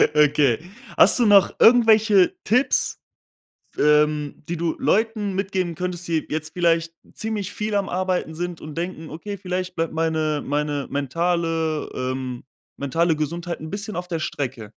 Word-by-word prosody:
Okay. 145 -5 +4 0.4
Hast - - +5
du 235 - +4
noch 200 -2 +6
irgendwelche 220 -5 +5
Tipps, 250 +6 +1 0.8
f - - -23
ähm, 150 -1 +2
die 170 - -2
du 165 0 -1
Leuten 215 -2 0
mitgeben 190 -3 -2
könntest, 180 0 -4
die 160 -2 0
jetzt 155 +1 -2
vielleicht 165 -1 +1 0.2
ziemlich 210 -3 -3
viel 210 0 -3
am 200 -1 0
Arbeiten 180 -3 -1
sind 175 0 -4
und 155 -1 -8
denken: 170 -2 -5
„Okay, 200 +6 -6
vielleicht 185 -1 -4
bleibt 165 0 -1
meine 160 -2 0
meine 145 -1 -1
mentale 165 +2 -1
ähm, 130 -1 -4 0.3
mentale 160 +4 +1
Gesundheit 170 +3 -4
'n 155 - -7
bisschen 200 0 -4
auf 180 0 -4
der 165 -2 -2
Strecke.“? 125 -8 -4
170 Hz, 150 wpm, -23 LUFS, 150-190 Hz, 0.8 s, noch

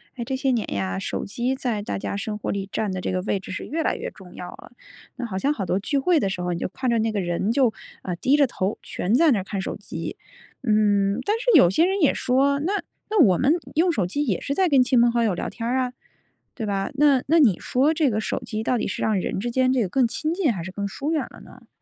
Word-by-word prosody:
诶， 240 - -4
这 265 - -3
些 265 0 0
年 235 -3 0
呀， 95 -1 -2
手 - - -3
机 245 +6 -1
在 240 -5 -2
大 205 - -3
家 - - -4
生 210 +1 -3
活 - - -5
里 195 -1 -3
占 215 -3 -1
的 185 -1 -3
这 - - -2
个 185 - -1
位 200 -1 -1
置 190 - -10
是 185 - -5
越 320 +3 -2
来 - - +1
越 - - -5
重 185 -3 -14
要 180 - -7
了。 - - -14 0.5
那 250 - -3
好 200 -5 -4
像 280 +9 +1
好 200 -9 -4
多 185 - 0
聚 280 +8 -1
会 335 +4 +3
的 195 - 0
时 185 -2 -4
候， 180 0 -1
你 170 - -4
就 - - -2
看 255 +7 -3
着 235 - +2
那 220 0 +1
个 210 - -1
人 180 +3 -1
就， 245 -2 +3 0.3
呃， 180 - -3
低 260 +11 +2
着 285 -2 +4
头 195 -4 -2
全 195 - -2
在 315 +5 +5
那 225 - +2
儿 - - -4
看 195 0 -4
手 - - -4
机。 - - -7 0.5
嗯， 205 -2 +2
但 420 - +2
是 465 - -7
有 260 - +7
些 320 - +3
人 385 +2 0
也 290 - +4
说： 275 +2 +2
“那 385 - 0 0.4
那 430 -4 +4
我 190 - +5
们 275 +4 +3 0.2
用 345 +3 +3
手 205 - 0
机 290 +11 -1
也 205 -9 0
是 280 - -2
在 375 +2 +3
跟 275 -4 +5
亲 250 0 +3
朋 240 0 +4
好 235 0 +1
友 215 -5 +2
聊 - - -3
天 230 -1 -5
儿 255 - +1
啊。” 250 -1 -1 0.6
对 225 - -4
吧？ 195 -1 -1
那 280 -2 +4
那 325 +4 +4
你 240 - +4
说 275 +5 +2
这 310 -3 +2
个 215 -2 -1
手 220 - -2
机 220 -1 -5
到 245 +1 +1
底 - - -1
是 - - -3
让 215 -3 +2
人 - - -3
之 240 +4 -3
间 255 +1 +2
这 260 - +2
个 205 - 0
更 245 +7 +2
亲 310 +7 -2
近 345 -7 +1
还 185 -6 -4
是 190 - -7
更 200 +1 -3
疏 280 +9 -4
远 320 - +1
了 - - -14
呢？ - - -16
235 Hz, 305 characters per minute, -24 LUFS, 195-275 Hz, 0.6 s, 有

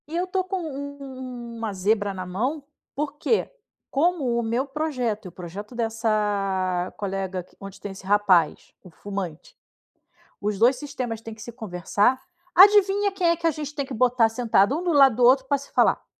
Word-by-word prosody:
E 315 - -6
eu 355 +1 0
estou 370 0 -1
com 375 0 -3
u 285 -2 -6
u 255 -3 -8
uma 225 -2 -3
zebra 205 +1 0
na 185 -1 -6
mão, 250 - -2 0.3
porque 300 +9 -1 0.4
como 280 -5 +1
o - - -1
meu 235 +4 0
projeto 270 -8 -2
e - - -6
o - - -16
projeto 185 +6 -9
dessa 205 -5 0
colega 190 -2 -3
onde 195 0 -10
tem 205 - -6
esse 195 0 -11
rapaz, 190 -5 +2
o 180 - -13
fumante, 185 -2 -7 0.9
os 205 0 -2
2 245 +5 +5
sistemas 250 -5 -5
têm 225 -1 -8
que 220 - -13
se 235 - -8
conversar, 210 +3 0 0.3
adivinha 405 +1 +6
quem 370 -3 +1
é 335 - +3
que 335 0 -3
a - - +5
gente 300 -1 -6
tem 280 - -2
que 265 - -6
botar 245 -1 +3
sentado 225 +2 +2
um - - -4
do 350 - +1
lado 275 -6 +6
do 245 - +3
outro 260 +2 +5
pra 280 +1 +1
se 280 - -13
falar? - - +3
235 Hz, 190 wpm, -24 LUFS, 200-285 Hz, 0.9 s, adivinha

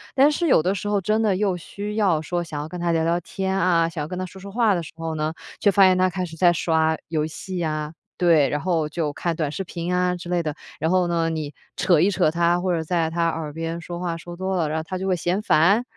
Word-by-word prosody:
但 280 +3 +6
是 335 +3 0
有 165 - +4
的 185 - +1
时 200 +1 -4
候 205 -1 +1
真 215 +4 +1
的 210 -4 +2
又 190 -2 0
需 205 +4 -6
要 190 -8 +2
说 175 +3 -2
想 155 -3 -5
要 150 - -6
跟 180 - -6
他 170 -1 0
聊 165 -1 +2
聊 170 +1 +1
天 190 +2 -3
啊， 170 -3 +3
想 155 -3 -4
跟 180 +2 -5
他 185 - -2
说 190 +2 -12
说 200 - -8
话 220 0 +2
的 175 - -1
时 165 - -10
候 165 0 -4
呢， 155 +1 -1 0.3
却 205 - +4
发 200 0 +5
现 185 -1 +6
他 185 0 +3
开 185 0 -3
始 165 -2 -10
在 175 +1 +5
刷 160 -1 +2
游 155 -2 0
戏 185 +4 -6
呀， 155 -2 -2 0.2
对。 165 -5 +4
然 145 - -2
后 165 -3 0
就 155 -1 -2
看 170 +3 -2
短 155 -3 -1
视 175 - -4
频 175 0 -4
啊 180 0 +1
之 175 0 -8
类 175 -1 +1
的。 155 -3 -3 0.2
然 160 - 0
后 180 0 +3
呢， 165 -1 +1
你 155 -2 -4 0.2
扯 175 -4 +3
一 180 +5 +4
扯 185 -5 +2
他， 170 +1 +2
或 185 0 0
者 165 - 0
在 165 0 0
他 170 +1 0
耳 160 -2 -3
边 165 +2 -4
说 175 +1 -6
话 175 -2 -2
说 175 +1 -9
多 190 +1 -2
了， 165 -4 0
然 160 +1 -1
后 - - -4
他 185 - -3
就 190 - -4
会 185 -2 +1
嫌 175 +4 0
烦。 200 +3 +4
175 Hz, 295 characters per minute, -23 LUFS, 160-185 Hz, 0.3 s, 但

